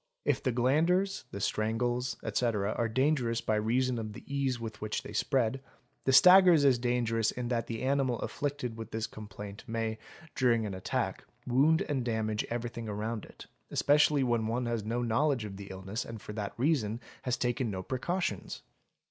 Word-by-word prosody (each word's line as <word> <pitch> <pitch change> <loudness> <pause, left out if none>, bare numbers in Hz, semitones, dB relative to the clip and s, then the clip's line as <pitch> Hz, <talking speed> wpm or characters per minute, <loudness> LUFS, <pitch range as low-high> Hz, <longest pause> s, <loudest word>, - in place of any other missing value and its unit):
If - - +1
the 130 - 0
glanders, 160 +10 +2
the 100 - -6
strangles, 120 +5 -1
etc., 110 -4 0
are 115 -1 0
dangerous 125 -1 +1
by 110 - -1
reason 120 +3 +1
of 110 -1 -5
the - - -10
ease 140 -3 -1
with 110 -2 -7
which 110 0 -2
they - - -8
spread, 130 -2 +1 0.4
the 135 - +3
staggers.is 170 -5 +7
dangerous 120 -2 +1
in 125 -1 -4
that 120 -2 -1
the 115 +1 -4
animal 135 -2 +1
afflicted 140 -5 -3
with 115 - -7
this 110 0 -2
complaint 105 -1 -9
may, 115 -1 -2 0.3
during 120 -4 +2
an 100 - -4
attack, 95 0 -2 0.2
wound 140 +6 +3
and 135 -4 -1
damage 110 -2 -1
everything 120 -1 -4
around 105 +1 -3
it, - - -13 0.2
especially 145 -1 +4
when 120 -3 +1
one 120 +2 -1
has 115 -2 -1
no 120 +3 -1
knowledge 120 +1 +1
of 100 -2 -7
the 100 -1 -8
illness, 95 +3 -5
and 115 -1 -8
for 105 - -8
that 105 -2 -4
reason 120 -5 +1 0.2
has 125 -1 -1
taken 120 -1 0
no 95 -2 -4
precautions. 130 - -3
120 Hz, 175 wpm, -31 LUFS, 110-130 Hz, 0.4 s, staggers.is